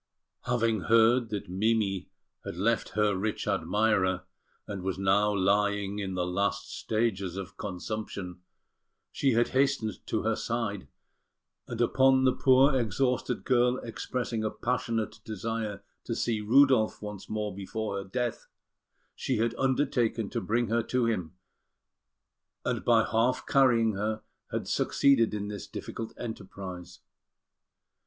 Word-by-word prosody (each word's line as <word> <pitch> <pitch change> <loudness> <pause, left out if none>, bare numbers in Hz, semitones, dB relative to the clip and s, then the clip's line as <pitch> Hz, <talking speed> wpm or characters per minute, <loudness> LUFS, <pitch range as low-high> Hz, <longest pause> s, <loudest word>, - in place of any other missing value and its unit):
Having 115 -4 +1
heard 115 +2 +4
that 105 -2 -4
Mimi 100 0 0 0.3
had - - -6
left 115 +5 +1
her 105 -2 +3
rich 105 +3 -2
admirer, 100 -2 +1 0.4
and 100 -2 -5
was 95 0 -2
now 100 +2 +3
lying 100 +1 +1
in 95 -2 -3
the 90 -1 0
last 100 +2 -1
stages 100 -5 -1
of 95 -2 -6
consumption, 95 -2 -5 0.7
she 135 -3 +1
had 120 +1 +3
hastened 135 -6 0
to - - -1
her - - +1
side; - - -3 0.8
and 120 - -6
upon 130 +2 +4
the 130 -1 +4
poor 135 +2 +5
exhausted 125 +2 0
girl 125 -1 +3
expressing 115 -1 -3
a 110 - +1
passionate 115 -2 -2
desire 110 -1 -4 0.2
to - - -2
see 115 -3 0
Rudolf 125 0 +4
once 105 -2 -7
more 105 -2 -2
before 100 +1 -4
her 100 - -3
death, 120 +4 -3 0.7
she - - -2
had 115 +1 +1
undertaken 125 -5 0
to - - -2
bring 115 +6 +1
her 115 +1 +2
to 125 +1 0
him, 90 -7 -2 1.3
and - - -1
by 115 -2 +5
half 115 +4 +1
carrying 120 -5 +4
her 110 +2 -2 0.3
had - - -3
succeeded 115 -6 +3
in 105 -1 -3
this 105 0 -6
difficult 115 +2 -6
enterprise. 95 -6 -7
110 Hz, 135 wpm, -29 LUFS, 100-120 Hz, 1.3 s, poor